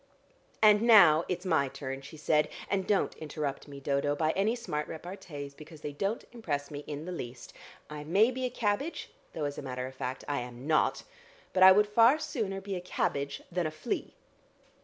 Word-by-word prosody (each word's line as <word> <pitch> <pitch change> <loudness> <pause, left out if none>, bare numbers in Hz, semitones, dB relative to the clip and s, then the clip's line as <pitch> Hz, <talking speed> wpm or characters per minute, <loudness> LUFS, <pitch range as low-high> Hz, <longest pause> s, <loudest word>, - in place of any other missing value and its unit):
"And 210 -1 +7
now 195 -9 +7
it's 180 +1 -3
my 160 -6 +2
turn," 135 0 -6
she 140 +3 -11
said, 150 0 +2 0.2
"and 195 -2 0
don't 200 -2 +2
interrupt 150 -3 -4
me, 140 -1 -9
Dodo, 140 +1 0
by 155 +1 +1
any 205 +6 +1
smart 150 -11 -3
repartees, 160 -4 -8
because 155 +1 -13
they 150 - -4
don't 195 +10 -2
impress 145 -12 -3
me 145 - -5
in 150 +1 -5
the 180 - -5
least. 120 -8 -7 0.3
I 150 -1 -7
may 200 +10 +4
be 260 +1 -4
a - - 0
cabbage 240 +6 -2 0.2
though 155 - -2
as 145 0 -4
a - - -5
matter 125 -2 -4
of 130 - -7
fact, 130 0 -5
I 145 -1 -1
am 125 +1 -8
not 155 0 +2 0.5
but 185 - +1
I 190 0 +11
would 210 +2 +5
far 230 +6 +5
sooner 210 -10 -3
be 195 0 -5
a 180 - -4
cabbage 140 -5 -2
than 175 -2 0
a - - -4
flea." 155 0 -4
155 Hz, 200 wpm, -30 LUFS, 145-200 Hz, 0.5 s, I